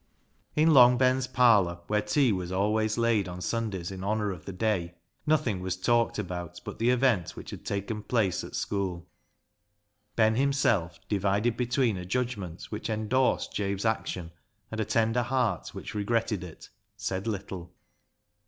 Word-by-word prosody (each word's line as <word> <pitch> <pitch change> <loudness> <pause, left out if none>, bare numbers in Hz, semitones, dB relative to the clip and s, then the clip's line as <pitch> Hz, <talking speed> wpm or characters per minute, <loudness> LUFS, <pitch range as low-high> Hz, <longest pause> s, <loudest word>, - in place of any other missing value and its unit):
In 155 +1 +5
Long 125 -2 +8
Ben's 130 0 +2
parlour, 110 -9 +4
where 105 +2 +1
tea 120 +4 +2
was 90 -2 -2
always 105 +3 +1
laid 115 -4 +2
on 90 0 -6
Sundays 95 -2 -2
in 95 -1 -6
honour 105 0 0
of 90 -4 -9
the - - -5
day, 90 -4 -1 0.3
nothing 125 -11 +2
was 95 0 -3
talked 115 +4 +2
about 90 -5 -5
but - - -7
the 115 +2 +3
event 125 -8 +2
which - - -9
had - - -8
taken 100 +2 -3
place 105 -5 0
at - - -8
school. 90 -4 -2 1.1
Ben 110 -1 +4
himself, 115 - +1
divided 105 +3 +1
between 125 -3 +1
a 90 - -6
judgment 105 -7 -3
which - - -4
endorsed 110 +4 +1
Jabe's 100 0 -2
action 90 -6 -2 0.4
and 110 0 -2
a - - 0
tender 115 +2 +2
heart 120 -6 0
which - - -7
regretted 110 -1 0
it, 85 -3 -11 0.3
said 95 +3 -3
little. 95 -4 -5
105 Hz, 155 wpm, -28 LUFS, 95-120 Hz, 1.1 s, Long